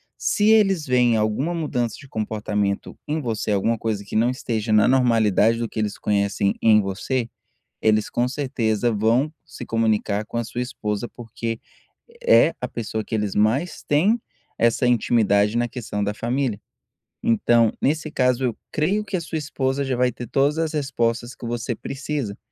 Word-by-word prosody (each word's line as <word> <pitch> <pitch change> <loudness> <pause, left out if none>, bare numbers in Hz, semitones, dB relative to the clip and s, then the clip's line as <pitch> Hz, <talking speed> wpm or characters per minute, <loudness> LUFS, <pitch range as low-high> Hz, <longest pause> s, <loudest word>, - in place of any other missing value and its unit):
se 210 +1 +1
eles 195 -7 +4
veem 125 -3 +3
alguma 110 +11 0
mudança 125 -8 -1
de 140 - -13
comportamento 105 -3 -2
em 155 +2 -1
você, 115 -7 -3
alguma 110 +3 +1
coisa 105 -2 -2
que - - -7
não 115 +3 +3
esteja 115 -4 -2
na 105 +1 +5
normalidade 115 -3 +3
do 115 - -2
que 110 - -6
eles 105 -1 -2
conhecem 100 -1 0
em 110 -1 +6
você, 105 +5 -2 0.5
eles 110 -1 +2
com 120 +1 0
certeza 125 -5 0
vão 115 +7 +2
se - - -9
comunicar 110 -2 0
com 115 - -6
a 115 - 0
sua 120 +2 -4
esposa, 110 -3 -3
porque 115 -1 -6 0.7
é - - +6
a - - -1
pessoa 110 -1 -4
que - - -3
eles 105 -2 -1
mais 120 +12 +1
têm 190 +11 +3 0.4
essa 115 +2 +2
intimidade 105 -3 +3
na 120 - +1
questão 105 -4 -4
da 100 +1 -1
família. 120 -1 -1 0.6
Então 115 0 +3
nesse 155 +2 0
caso 125 -3 +1
eu 120 -4 -1 0.2
creio 195 +8 +1
que 200 - -3
a 170 - -3
sua 165 0 -4
esposa 140 -2 -1
já 130 -1 -1
vai 125 0 +2
ter 120 +1 -8
todas 140 +6 +1
as 160 -1 -1
respostas 120 -4 -1
que 120 - -8
você 120 0 -2
precisa. 135 -4 -4
120 Hz, 170 wpm, -23 LUFS, 110-135 Hz, 0.7 s, em